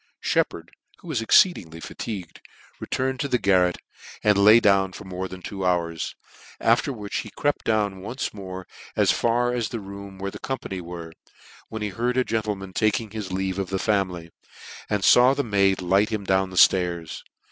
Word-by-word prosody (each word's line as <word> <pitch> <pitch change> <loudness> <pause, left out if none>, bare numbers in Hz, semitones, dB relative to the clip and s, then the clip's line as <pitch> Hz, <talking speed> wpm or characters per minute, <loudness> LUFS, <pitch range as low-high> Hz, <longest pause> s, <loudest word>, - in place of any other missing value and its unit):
Sheppard, - - -1 0.3
who - - -16
was 135 -7 -1
exceedingly 100 - +3
fatigued, 95 +2 -7 0.4
re - - -7
turned 130 0 -1
to 140 - -1
the 125 - +2
garret, 90 -5 +3 0.5
and 105 -1 +4
laid 105 +4 +7
down 95 -2 +3
for - - -9
more 95 0 -4
than 95 -1 -10
two 95 -2 -5
hours: 85 -3 -1 0.4
after 115 +5 +2
which 105 -5 -5
he 110 - -4
crept 145 +7 -1
down 105 -4 0
once 120 +7 -4
more 95 -2 -7 0.3
as - - +4
far 120 +1 +1
as 120 -3 -1
the 115 - -4
room 100 -1 -9
where 100 +1 -4
the - - -9
company 115 -8 -4
were, 85 -1 -8 0.6
when 110 -1 -5
he 105 - -1
heard 120 +6 -1
a 130 - +4
gentleman 105 -5 -3
taking 110 +1 0
his 105 -4 -5
leave 95 0 -2
of 95 -2 -3
the 95 - -1
family, 95 -5 -1 0.6
and 105 -2 0
law 125 +2 +5
the 140 - 0
maid 100 -4 +2
light 95 +4 +3
him 110 -3 -3
down 95 0 +1 0.2
(lairs. 85 -3 -3
100 Hz, 180 wpm, -24 LUFS, 95-115 Hz, 0.6 s, laid